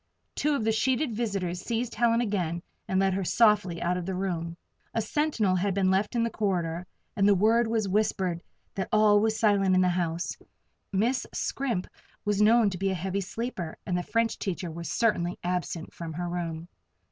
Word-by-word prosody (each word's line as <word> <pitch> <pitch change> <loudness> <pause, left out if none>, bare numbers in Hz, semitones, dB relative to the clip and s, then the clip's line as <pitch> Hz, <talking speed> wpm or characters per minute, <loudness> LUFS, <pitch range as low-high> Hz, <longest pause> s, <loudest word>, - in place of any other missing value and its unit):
Two 300 0 +1
of 235 - -1
the 220 - +2
sheeted 250 +4 +1
visitors 195 -6 -2
seized 235 +2 -2
Helen 230 +1 +3
again 180 -6 -1 0.2
and 190 - +1
led 195 -1 +2
her 195 +1 -1
softly 205 -4 +3
out 180 +1 +1
of 180 0 -5
the 190 - -2
room. 170 -3 -3 0.4
A - - +2
sentinel 225 -7 +1
had 190 +1 0
been 190 -1 +3
left 200 +5 +1
in 235 - +2
the 230 - -1
corridor, 180 -4 -1 0.3
and 200 -2 +3
the 205 - +6
word 225 +4 +3
was 225 -2 0
whispered 190 -3 0 0.3
that 190 - -3
all 215 -1 +5
was 220 +1 +1
silent 200 -3 +3
in 185 - +4
the 180 - +3
house; 175 -1 -1 0.6
Miss 230 +7 +1
Scrimp 240 -9 -1 0.4
was 205 0 +1
known 220 -1 +5
to 180 - -5
be 195 0 +1
a 190 - 0
heavy 190 +3 -2
sleeper, 195 -4 -5
and 180 - -1
the 180 - +1
French 230 +4 0
teacher 180 -3 -3
was 170 +1 -6
certainly 180 -6 +1
absent 175 -2 -3
from 165 -2 -6
her 175 +2 -3
room. 170 -1 -4
195 Hz, 195 wpm, -28 LUFS, 180-220 Hz, 0.6 s, the